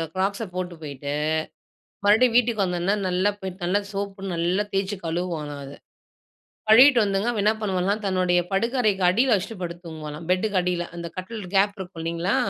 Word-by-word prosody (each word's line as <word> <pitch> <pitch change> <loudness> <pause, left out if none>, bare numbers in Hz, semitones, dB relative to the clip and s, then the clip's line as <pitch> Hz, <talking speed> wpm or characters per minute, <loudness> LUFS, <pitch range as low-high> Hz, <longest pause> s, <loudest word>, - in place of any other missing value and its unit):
க்ராக்ஸை 200 +3 -1
போட்டு 180 -1 -3
போயிட்டு 140 -1 -5 0.9
மறுபடியும் 225 +3 +5
வீட்டுக்கு 235 -4 +3
வந்தோன்னே 180 +2 0
நல்லா 185 +2 +2
போயிட்டு 190 -1 -7
நல்லா 185 +3 +2
சோப்பு 200 -1 -4
நல்லா 175 +4 +1
தேச்சு 195 +1 0
கழுவுவாளாம் 160 -4 -3
அத. 140 0 -9 1.0
கழுவீட்டு 250 +3 +8
வந்துங்க 200 +2 0
அவ 225 - -3
என்ன 215 - +5
பண்ணுவாளாம்? 195 +1 0
தன்னுடைய 185 -2 +2
படுக்க 230 +6 0
அறைக்கு 200 -4 +1
அடியில 235 +5 +3
வச்சுட்டு 205 +1 -4
படுத்து 175 0 -6
தூங்குவாளாம். 155 0 -7
பெட்டுக்கு 200 +2 +1
அடியில. 175 -1 -1
அந்த 170 0 -5
கட்டில் 210 +3 -6
கேப் 200 +1 +3
இருக்கும். 180 -3 -7
இல்லேங்களா! 170 +3 0
190 Hz, 160 wpm, -24 LUFS, 175-205 Hz, 1.0 s, கழுவீட்டு